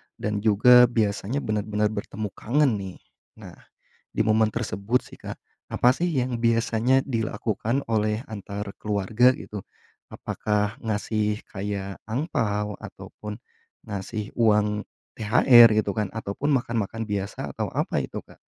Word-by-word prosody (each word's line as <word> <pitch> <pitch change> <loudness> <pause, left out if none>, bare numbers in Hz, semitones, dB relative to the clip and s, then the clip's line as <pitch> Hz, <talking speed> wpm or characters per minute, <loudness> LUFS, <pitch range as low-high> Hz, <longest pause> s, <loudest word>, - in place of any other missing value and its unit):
dan 105 -1 -2
juga 120 +4 +6
biasanya 115 +3 -1
benar-benar 105 0 0
bertemu 105 0 -5
kangen, 135 +3 +1
nih. 95 -2 -7 0.5
Nah, - - -10 0.6
di - - +2
momen 110 0 +2
tersebut 115 +1 -1
sih, - - -14
Kak, - - -7 0.3
apa 125 - +3
sih 175 +7 0
yang 125 -2 -1
biasanya 115 +2 +2
dilakukan 115 +1 -2
oleh 110 0 +1
antar 100 -1 -6
keluarga 110 +5 +2
gitu? 105 -3 -8 0.5
Apakah 105 +1 -2
ngasih 105 -1 -1
kayak 100 -1 -4
angpao, 110 - -2
ataupun 105 0 -9 0.5
ngasih 105 +2 -5
uang 105 -2 +2 0.3
THR, 120 +2 +7
gitu 100 - -3
kan, 105 -2 0
ataupun 110 +6 -3
makan-makan 115 -3 -1
biasa, 100 -2 -4
atau - - -3
apa - - 0
itu, - - -6
Kak? - - -19
110 Hz, 125 wpm, -25 LUFS, 105-120 Hz, 0.6 s, THR